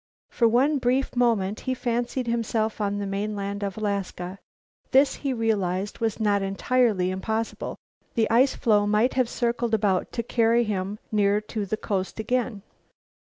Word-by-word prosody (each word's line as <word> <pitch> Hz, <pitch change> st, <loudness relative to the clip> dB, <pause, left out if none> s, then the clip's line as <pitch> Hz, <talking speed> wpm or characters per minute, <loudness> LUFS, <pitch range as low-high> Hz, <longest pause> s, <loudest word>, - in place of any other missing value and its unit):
For 235 Hz, -, +3 dB
one 270 Hz, +6 st, +3 dB
brief 255 Hz, +2 st, 0 dB
moment 220 Hz, -5 st, +1 dB
he 260 Hz, -1 st, -2 dB
fancied 240 Hz, +1 st, -1 dB
himself 225 Hz, -2 st, -1 dB
on 205 Hz, 0 st, 0 dB
the 205 Hz, -, -2 dB
mainland 200 Hz, 0 st, -3 dB
of 195 Hz, -1 st, -3 dB
Alaska. 200 Hz, -3 st, -3 dB, 0.5 s
This, 270 Hz, +2 st, +4 dB
he 275 Hz, -, -2 dB
realized, 205 Hz, -5 st, -1 dB
was 225 Hz, -1 st, -1 dB
not 205 Hz, -2 st, +2 dB
entirely 195 Hz, -1 st, +1 dB
impossible; 220 Hz, +4 st, -3 dB, 0.4 s
the 225 Hz, -1 st, +3 dB
ice 255 Hz, +4 st, +4 dB
floe 210 Hz, -4 st, +2 dB
might 215 Hz, +4 st, +2 dB
have 255 Hz, -3 st, +1 dB
circled 235 Hz, -1 st, 0 dB
about 200 Hz, -3 st, 0 dB
to 235 Hz, -, -2 dB
carry 235 Hz, 0 st, +3 dB
him 200 Hz, -1 st, -2 dB
near 205 Hz, -1 st, +3 dB
to 210 Hz, -3 st, -2 dB
the 215 Hz, -, -1 dB
coast 195 Hz, -1 st, -3 dB
again. 225 Hz, -2 st, -1 dB
220 Hz, 155 wpm, -25 LUFS, 200-240 Hz, 0.5 s, This